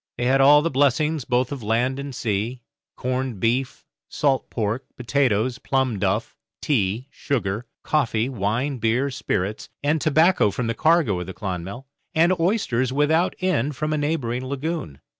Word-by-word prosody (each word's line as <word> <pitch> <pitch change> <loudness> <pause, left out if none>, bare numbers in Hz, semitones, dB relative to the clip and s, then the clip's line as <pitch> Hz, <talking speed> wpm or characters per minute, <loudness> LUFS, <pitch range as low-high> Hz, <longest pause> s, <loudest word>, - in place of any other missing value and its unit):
They 120 - -1
had 135 +2 +4
all 145 +2 +7
the 165 - 0
blessings 145 +2 +2
both 125 +1 +1
of 140 -3 -5
land 120 +5 0
and 140 -2 -6
sea 115 +3 -2 0.3
corned 130 -3 -2
beef, 125 +5 -1 0.2
salt 140 -3 0
pork, 115 +3 -2
potatoes, 125 -2 +1
plum 130 -6 0
duff, 100 +5 -1 0.2
tea, 115 -3 0
sugar, 115 -4 -2 0.2
coffee, 120 -6 +1
wine, 125 +3 -1
beer, 120 +5 +1
spirits, 105 -4 -3
and 150 +1 +1
tobacco 160 - +4
from 120 +5 -3
the 115 - 0
cargo 155 - +2
of 90 - -5
the 95 - -7
'Clonmel', 95 +6 -5 0.3
and 170 +3 +4
oysters 165 - +1
without 155 +6 +2
end 150 -7 0
from 155 +3 -2
a - - 0
neighbouring 135 -5 -1
lagoon. 140 - -4
130 Hz, 155 wpm, -23 LUFS, 115-145 Hz, 0.3 s, all